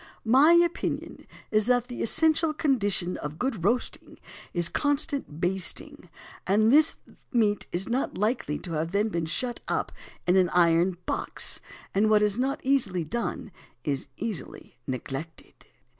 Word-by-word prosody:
My 270 Hz, +8 st, +6 dB
opinion 345 Hz, 0 st, 0 dB, 0.2 s
is 215 Hz, 0 st, +3 dB
that 245 Hz, -1 st, +2 dB
the 245 Hz, -, -6 dB
essential 320 Hz, +4 st, +2 dB
condition 205 Hz, -, +1 dB
of 150 Hz, +1 st, -6 dB
good 235 Hz, -7 st, -2 dB
roasting 235 Hz, +6 st, -1 dB, 0.3 s
is 175 Hz, -1 st, +2 dB
constant 285 Hz, -, -1 dB
basting, 185 Hz, +1 st, -2 dB, 0.4 s
and 215 Hz, +5 st, +4 dB
this 310 Hz, +2 st, +5 dB
the -, -, -20 dB, 0.2 s
meat 210 Hz, -3 st, +2 dB
is 180 Hz, +3 st, -2 dB
not 250 Hz, +3 st, -1 dB
likely 210 Hz, -, -1 dB
to 175 Hz, -, -8 dB
have 165 Hz, +3 st, -2 dB
when 200 Hz, -6 st, 0 dB
shut 240 Hz, +8 st, -2 dB
up -, -, -1 dB, 0.3 s
in 180 Hz, +2 st, +3 dB
an 185 Hz, -2 st, +4 dB
iron 175 Hz, +1 st, +3 dB
box; -, -, 0 dB, 0.3 s
and 210 Hz, +2 st, +3 dB
what 210 Hz, -1 st, +4 dB
is 210 Hz, +2 st, +1 dB
not 275 Hz, +3 st, -1 dB
easily 235 Hz, -10 st, +1 dB
done 230 Hz, +2 st, -4 dB, 0.3 s
is 140 Hz, -2 st, -2 dB
easily 205 Hz, -, -5 dB
neglected." 135 Hz, +5 st, -6 dB
210 Hz, 145 wpm, -27 LUFS, 175-255 Hz, 0.4 s, My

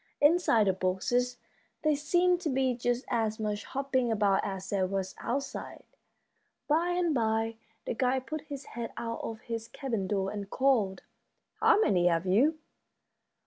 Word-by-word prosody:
Inside 290 Hz, -8 st, +4 dB
the 190 Hz, -, +3 dB
boxes 245 Hz, +7 st, 0 dB, 0.5 s
there 305 Hz, -1 st, +3 dB
seemed 350 Hz, +4 st, +2 dB
to 330 Hz, -, -1 dB
be 265 Hz, -1 st, +1 dB
just 245 Hz, +1 st, -1 dB
as 220 Hz, -2 st, 0 dB
much 210 Hz, -1 st, -2 dB
hopping 265 Hz, -3 st, 0 dB
about 205 Hz, -3 st, +2 dB
as 190 Hz, -1 st, -4 dB
there 190 Hz, -2 st, +1 dB
was 190 Hz, 0 st, -2 dB
outside. 275 Hz, +3 st, -4 dB, 0.8 s
By 325 Hz, +4 st, +2 dB
and 350 Hz, -2 st, +1 dB
by 225 Hz, -2 st, 0 dB, 0.3 s
the -, -, -1 dB
guide 255 Hz, +2 st, 0 dB
put 310 Hz, 0 st, -4 dB
his 285 Hz, -3 st, -8 dB
head 235 Hz, -1 st, -5 dB
out 230 Hz, 0 st, -3 dB
of 220 Hz, -1 st, -6 dB
his 230 Hz, -1 st, -5 dB
cabin 230 Hz, -9 st, -3 dB
door 195 Hz, -1 st, 0 dB
and 200 Hz, -2 st, -5 dB
called, 235 Hz, -8 st, +1 dB, 0.6 s
"How 445 Hz, -1 st, +5 dB
many 180 Hz, -, +3 dB
have 170 Hz, 0 st, +1 dB
you?" 255 Hz, -, +3 dB
235 Hz, 155 wpm, -30 LUFS, 205-280 Hz, 0.8 s, How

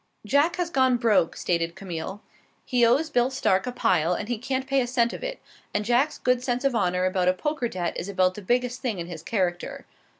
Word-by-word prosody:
"Jack 290 Hz, +9 st, +3 dB
has 355 Hz, -1 st, -2 dB
gone 260 Hz, -3 st, +3 dB
broke," 220 Hz, -8 st, +2 dB
stated 170 Hz, -1 st, -1 dB
Camille. 190 Hz, +2 st, -6 dB, 0.4 s
"He 245 Hz, -1 st, +2 dB
owes 275 Hz, +7 st, +3 dB
Bill 245 Hz, -1 st, +3 dB
Stark 195 Hz, -5 st, +1 dB
a -, -, -1 dB
pile, 180 Hz, -8 st, +2 dB
and 210 Hz, -, -5 dB
he 240 Hz, -3 st, -1 dB
can't 260 Hz, +2 st, -2 dB
pay 270 Hz, 0 st, +2 dB
a 245 Hz, -, -1 dB
cent 240 Hz, -1 st, +1 dB
of -, -, -7 dB
it; -, -, -4 dB, 0.4 s
and 210 Hz, 0 st, 0 dB
Jack's 255 Hz, +6 st, +2 dB, 0.2 s
sense 250 Hz, 0 st, -2 dB
of 275 Hz, -2 st, +2 dB
honor 180 Hz, -4 st, +1 dB
about 185 Hz, -1 st, +1 dB
a 185 Hz, -, +5 dB
poker 295 Hz, +5 st, -2 dB
debt 180 Hz, -5 st, -3 dB
is 185 Hz, -, -4 dB
about 185 Hz, -2 st, +2 dB
the 210 Hz, -, -8 dB
biggest 245 Hz, +4 st, 0 dB
thing 240 Hz, -7 st, -2 dB
in 170 Hz, -, -4 dB
his 170 Hz, -2 st, -8 dB
character. 180 Hz, -3 st, -2 dB
235 Hz, 220 wpm, -25 LUFS, 185-260 Hz, 0.4 s, a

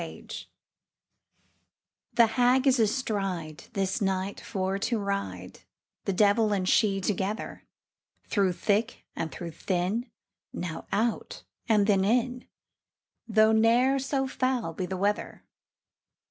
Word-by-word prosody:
THE -, -, -4 dB
HAG -, -, -12 dB, 1.8 s
The 235 Hz, -, +6 dB
Hag 250 Hz, +3 st, +3 dB
is 260 Hz, -2 st, +4 dB
astride, 195 Hz, -, -1 dB
This 195 Hz, +2 st, -1 dB
night 190 Hz, 0 st, -1 dB
for 190 Hz, 0 st, -2 dB
to 230 Hz, +3 st, 0 dB
ride, 150 Hz, -, -4 dB, 0.5 s
The -, -, +1 dB
devil 210 Hz, +2 st, +3 dB
and 185 Hz, -2 st, -1 dB
she 200 Hz, -1 st, +3 dB
together; 200 Hz, +2 st, -3 dB, 0.6 s
Through 195 Hz, -4 st, +1 dB
thick 215 Hz, +5 st, -1 dB
and 160 Hz, -, -3 dB
through 170 Hz, -1 st, -6 dB
thin, 185 Hz, +8 st, -2 dB, 0.4 s
Now 165 Hz, -3 st, -5 dB
out, 225 Hz, +2 st, -1 dB, 0.3 s
and 210 Hz, -2 st, +4 dB
then 200 Hz, -2 st, +3 dB
in, 245 Hz, +4 st, 0 dB, 0.8 s
Though 220 Hz, 0 st, +4 dB
ne'er 235 Hz, +5 st, +4 dB
so 270 Hz, 0 st, -1 dB
foul 255 Hz, -9 st, -1 dB
be 180 Hz, +2 st, -3 dB
the 190 Hz, -, -4 dB
weather. 205 Hz, +2 st, -1 dB
205 Hz, 120 wpm, -28 LUFS, 190-235 Hz, 1.8 s, The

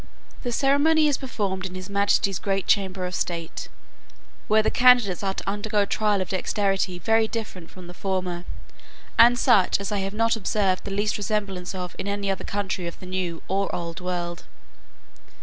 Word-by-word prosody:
The 245 Hz, -, -3 dB
ceremony 290 Hz, +5 st, +3 dB
is 290 Hz, -, +1 dB
performed 200 Hz, -8 st, -3 dB
in 185 Hz, -, -10 dB
his 185 Hz, 0 st, -6 dB
majesty's 200 Hz, -1 st, +1 dB
great 195 Hz, -1 st, -1 dB
chamber 190 Hz, -2 st, +1 dB
of 180 Hz, -, -4 dB
state, 170 Hz, -2 st, -4 dB, 0.8 s
where 215 Hz, +1 st, +4 dB
the -, -, +1 dB
candidates 245 Hz, -7 st, +5 dB
are 195 Hz, -1 st, -2 dB
to -, -, -7 dB
undergo 205 Hz, +1 st, 0 dB
a -, -, -2 dB
trial 210 Hz, -1 st, +1 dB
of 185 Hz, -, -4 dB
dexterity 195 Hz, -1 st, 0 dB
very 225 Hz, +5 st, +2 dB
different 210 Hz, -7 st, -6 dB
from 185 Hz, -1 st, -12 dB
the 175 Hz, -, -10 dB
former, 180 Hz, -2 st, -3 dB, 0.8 s
and 240 Hz, +1 st, +8 dB
such 235 Hz, -8 st, +4 dB
as 200 Hz, +1 st, -4 dB
I 205 Hz, -, 0 dB
have 195 Hz, +1 st, -3 dB
not 230 Hz, +1 st, +2 dB
observed 195 Hz, -3 st, 0 dB
the -, -, -4 dB
least 205 Hz, +2 st, 0 dB
resemblance 200 Hz, -3 st, -2 dB
of 180 Hz, -1 st, -5 dB
in -, -, -3 dB
any 200 Hz, -1 st, -1 dB
other 190 Hz, -, -4 dB
country 195 Hz, -3 st, -3 dB
of 170 Hz, -, -8 dB
the -, -, -10 dB
new 180 Hz, -3 st, -3 dB
or 195 Hz, +1 st, 0 dB
old 170 Hz, -1 st, -5 dB
world. 175 Hz, -1 st, -4 dB
195 Hz, 185 wpm, -25 LUFS, 185-215 Hz, 0.8 s, and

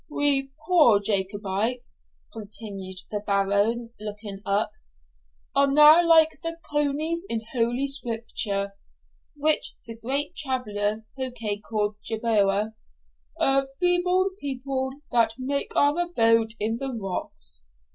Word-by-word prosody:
'We 285 Hz, -2 st, +1 dB, 0.2 s
poor 300 Hz, -, +5 dB
Jacobites,' 205 Hz, -, -1 dB, 0.3 s
continued 200 Hz, -3 st, -5 dB
the 210 Hz, -, -1 dB
Baron, 205 Hz, +4 st, +1 dB
looking 210 Hz, -1 st, -6 dB
up, 200 Hz, +2 st, +1 dB, 0.8 s
'are 280 Hz, 0 st, +3 dB
now 300 Hz, +4 st, +8 dB
like 325 Hz, -2 st, +6 dB
the 330 Hz, 0 st, -3 dB
conies 295 Hz, +3 st, 0 dB
in 225 Hz, -1 st, 0 dB
Holy 240 Hz, +2 st, +1 dB
Scripture 225 Hz, -6 st, 0 dB, 0.6 s
(which 300 Hz, +1 st, +2 dB
the 230 Hz, -, -7 dB
great 275 Hz, +8 st, -2 dB
traveller 220 Hz, -7 st, -1 dB
Pococke 240 Hz, -6 st, -4 dB
calleth 210 Hz, -1 st, -1 dB
Jerboa), 215 Hz, -2 st, +1 dB, 0.7 s
a 270 Hz, 0 st, +3 dB
feeble 360 Hz, +1 st, +2 dB
people, 265 Hz, -2 st, -3 dB, 0.2 s
that 230 Hz, -2 st, +3 dB
make 280 Hz, +2 st, -2 dB
our 285 Hz, +1 st, +4 dB
abode 230 Hz, -10 st, +2 dB
in 225 Hz, +2 st, -1 dB
the 270 Hz, +2 st, -4 dB
rocks. 70 Hz, -, -4 dB
230 Hz, 110 wpm, -25 LUFS, 205-280 Hz, 0.8 s, now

